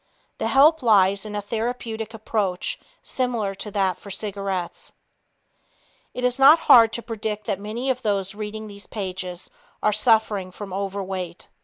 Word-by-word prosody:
The - - 0
help 300 +4 +5
lies 200 -3 +3
in 210 - -6
a 205 - -3
therapeutic 225 0 -4
approach 205 -4 -2 0.2
similar 235 -6 -1
to 205 +2 -6
that 195 -2 0
for 200 - -12
cigarettes. 195 -3 -4 1.2
It 250 - -4
is 250 +1 +1
not 290 +5 +8
hard 230 -2 +8
to 235 - -4
predict 215 -2 -4
that 200 -3 -2
many 230 +6 -2
of 255 0 -4
those 200 -4 -1
reading 215 +1 -6
these 200 -1 -11
pages 185 -3 -6 0.3
are 210 - +3
suffering 215 -3 +2
from 195 +1 -9
overweight. 190 -3 -4
210 Hz, 150 wpm, -23 LUFS, 195-225 Hz, 1.2 s, not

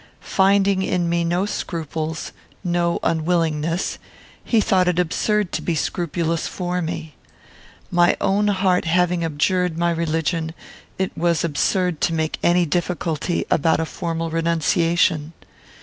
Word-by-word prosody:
Finding 195 0 +3
in 180 -2 0
me 170 0 +1
no 175 +3 0
scruples, 160 -5 -4 0.3
no 175 -1 +1
unwillingness, 165 0 0 0.4
he 230 - +2
thought 185 -3 +2
it 180 -1 +1
absurd 190 +3 +1
to - - -2
be 170 - -1
scrupulous 165 0 -1
for 180 0 -3
me. 160 -2 -5 0.8
My 175 -1 +4
own 205 +2 +2
heart 190 -3 +2
having 175 +1 +2
abjured 165 +2 0
my 170 0 +2
religion, 165 0 -1 0.4
it 190 0 -2
was 170 -1 +1
absurd 170 +2 0
to 165 - +1
make 160 -1 -1
any 175 0 +3
difficulty 170 0 -1
about 160 +1 +3
a 160 - 0
formal 165 0 -3
renunciation. 165 -1 +1
170 Hz, 130 wpm, -21 LUFS, 160-180 Hz, 0.8 s, My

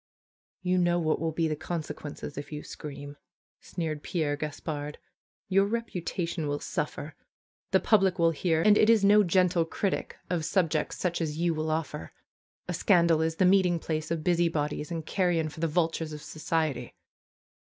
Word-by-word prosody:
^^You 180 0 +2
know 175 -1 +3
what 160 -2 +1
will 165 0 -1
be 160 +1 0
the 155 - -1
consequences 150 -2 -6
if 145 +2 -7
you 150 0 -5
scream," 145 -1 -8 0.4
sneered 160 -4 -4
Pierre 155 -4 -1
Gaspard. 150 0 -5 0.5
^^Your 195 +1 +4
reputation 180 -7 -3
will 145 0 -1
suffer. 150 +1 -4 0.6
The 190 - +3
public 195 -4 +3
will 165 -1 +4
hear, 165 0 +1
and 210 -1 +6
it 215 - +5
is 220 -3 +5
no 210 +1 +7
gentle 180 -1 +3
critic 185 +4 -2
of 175 -3 -1
subjects 165 -3 0
such 175 -2 -1
as 155 -2 -2
you 170 0 +1
will 155 0 -2
offer. 155 -1 -3 0.5
A - - -2
scandal 170 -5 +4
is 160 0 0
the 185 - +3
meeting 180 -2 +4
place 155 -1 -3
of 165 -2 -2
busy 175 0 +3
bodies 150 -1 -2
and 165 -2 -4
carrion 170 -3 +1
for 150 - -11
the 165 - +1
vultures 160 -1 0
of 150 - -8
society." 155 -2 -2
165 Hz, 170 wpm, -28 LUFS, 155-180 Hz, 0.6 s, no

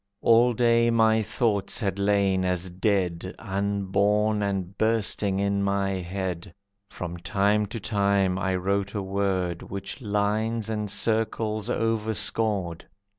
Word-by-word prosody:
All 120 +2 +5
day 115 0 +3
my 110 -1 +4
thoughts 110 -1 0
had 100 -3 -2
lain 100 -2 +2
as 90 0 -1
dead, 95 -2 -1
Unborn 100 +1 0
and 95 -2 -2
bursting 105 -2 0
in 100 0 +1
my 100 0 0
head. 95 -1 -4 0.3
From 90 -1 -6
time 100 +3 +1
to 115 +3 -6
time 100 -3 +1
I 95 -1 0
wrote 100 +2 -1
a 100 - -2
word 95 -3 -1
Which 100 +6 -7
lines 110 +1 -1
and 105 -1 -2
circles 110 0 -1
overscored. 110 -5 -1
100 Hz, 125 wpm, -26 LUFS, 95-110 Hz, 0.3 s, All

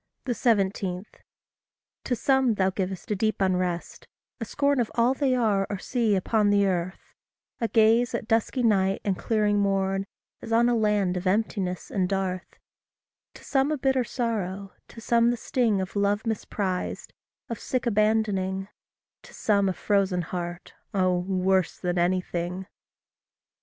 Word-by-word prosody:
17. 195 -6 0 1.0
To 250 - 0
some 265 -2 +2
thou 190 -1 +2
giv'st 190 +1 -4
a - - +2
deep 215 +2 0
unrest 180 -2 -1 0.3
a 230 - -3
scorn 280 +4 +1
Of 235 - 0
all 235 +2 +3
they 270 -2 +1
are 210 -5 +1
or 205 - -2
see 225 +1 0
upon 205 +2 +2
the 200 0 +4
earth; 185 -1 -3 0.5
A 230 - 0
gaze, 225 +2 +3
at 225 - -4
dusky 230 +3 +1
night 195 -3 +2
and 195 -2 +1
clearing 210 0 +1
morn, 195 -1 0 0.3
As - - -8
on 235 +1 +4
a 240 - +2
land 210 -4 +1
of 180 +1 -3
emptiness 190 -2 -1
and 185 -3 0
dearth; 190 -2 -3 0.8
To - - -13
some 275 +1 +1
a 305 - 0
bitter 265 -1 +1
sorrow; 200 -6 -3
to - - -12
some 235 +1 +3
the 240 - 0
sting 225 -4 +1
Of 190 +1 -4
love 205 +1 +1
misprized 200 -4 -3 0.4
of 230 - -5
sick 255 0 -2
abandoning; 205 -3 +1 0.5
To - - -15
some 200 -2 +2
a - - -1
frozen 190 -3 +1
heart, 175 +1 -6 0.2
oh, 185 -2 +2
worse 185 0 +1
than 180 -1 -1
anything! 180 0 -1
200 Hz, 150 wpm, -26 LUFS, 185-230 Hz, 1.0 s, the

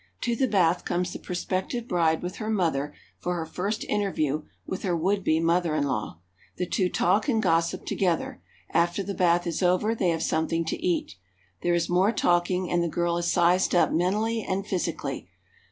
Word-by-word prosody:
To 240 -1 0
the 260 +2 +1
bath 180 -5 +2
comes 180 +1 -1
the - - -6
prospective 185 +6 -3
bride 165 -2 +1
with 180 +1 -5
her 215 - -4
mother 160 -9 0 0.3
for 180 0 -2
her 165 -2 -3
first 200 +6 -3
interview 155 -8 0 0.2
with 190 - -4
her 180 -4 0
would 195 +4 0
be 160 -1 +2
mother 165 -1 +1
in 150 - +1
law. 110 - -3 0.4
The 180 - -1
two 185 +1 0
talk 200 +12 +2
and 225 -4 +2
gossip 170 -4 +1
to - - -2
gether. 175 -4 -1 0.3
After 175 +3 +2
the 200 +1 -4
bath 175 -1 +2
is 170 0 -2
over 185 +5 +2
they 195 -6 +1
have 165 -1 0
something 165 +1 0
to - - -4
eat. 175 - -1 0.4
There 175 0 +2
is 170 -1 0
more 185 +4 +3
talking, 180 -2 +1
and 175 - +2
the 170 - 0
girl 170 +1 0
is 170 0 0
sized 180 +2 +3
up 175 - +4
mentally 210 +7 +1
and 195 -1 -2
physically. 160 - -3
175 Hz, 195 wpm, -26 LUFS, 165-195 Hz, 0.4 s, up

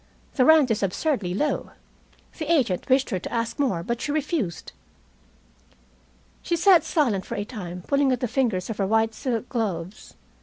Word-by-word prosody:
"The 255 - +3
rent 310 -5 +6
is 220 - 0
absurdly 195 - -1
low. 295 +8 -1 0.7
The 310 0 -2
agent 250 - +1
wished 265 +1 +3
her 185 - 0
to - - -7
ask 230 +1 -2
more, 235 -12 0
but 235 +5 -3
she 290 - -2
refused." 290 - -2 1.7
She 345 - -1
sat 340 -1 +5
silent 250 - +1
for - - -6
a 205 - -3
time, 180 -6 -7
pulling 280 -1 +2
at 250 - 0
the 250 - -1
fingers 220 -8 0
of 215 - -6
her 195 - 0
white 225 +1 +2
silk 240 0 -3
gloves. 200 -6 -4
235 Hz, 175 wpm, -24 LUFS, 195-285 Hz, 1.7 s, rent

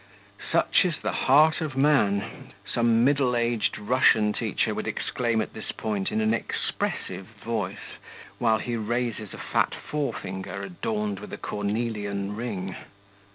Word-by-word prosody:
'Such 170 - +4
is 170 -5 0
the - - 0
heart 155 +5 +4
of 150 -4 -3
man!' 105 -9 +2
some 115 -1 +3
middle 135 -2 +3
aged 120 -1 +1
Russian 105 -2 +4
teacher - - 0
would - - -4
exclaim 115 -3 0
at - - -5
this 110 - -6
point 105 -3 -2
in 110 - +1
an 110 0 +3
expressive 95 -3 -2 0.2
voice, 105 -5 -3 0.4
while 110 -2 +4
he 120 +2 -3
raises 115 -1 -2
a - - -8
fat - - 0
forefinger, 100 -9 -4
adorned 105 +2 -2
with 105 - -9
a - - -5
cornelian 105 -1 -2
ring. 100 -5 -4
110 Hz, 140 wpm, -26 LUFS, 100-125 Hz, 0.4 s, Such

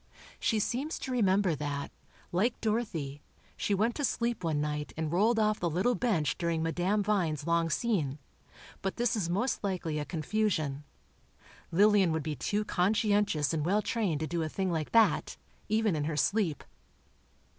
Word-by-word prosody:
She 225 - +1
seems 265 +9 -1
to 260 - -5
remember 195 -6 +3
that, 145 -1 -4 0.4
like 210 +8 +1
Dorothy, 195 -11 -2 0.3
she 205 - 0
went 220 +5 +1
to 290 - -2
sleep 235 -5 -1
one 160 -3 0
night 150 0 -3
and 160 -1 -2
rolled 215 +7 +3
off 215 -1 +2
the 175 - 0
little 185 +10 +1
bench 190 -9 0
during 170 -2 0
Madame 180 +5 +1
Vine's 170 -8 0
long 170 0 +2
scene, 165 - 0 0.6
but 195 - -2
this 240 -1 +1
is 190 -6 -1
most 210 +9 -1
likely 175 -6 -2
a 150 - -3
confusion. 160 -5 -1 0.9
Lillian 200 0 +5
would 160 -1 -1
be 155 0 -3
too 210 +8 -1
conscientious 205 - +1
and 155 -2 0
well 200 +6 +2
trained 190 -10 -1
to - - 0
do 170 0 -2
a 160 - -2
thing 190 +2 -1
like 160 -3 -2
that, 225 -1 +3 0.3
even 215 -3 +2
in 150 -1 -1
her 155 -1 -2
sleep. 190 -5 +1
185 Hz, 165 wpm, -30 LUFS, 155-215 Hz, 0.9 s, Lillian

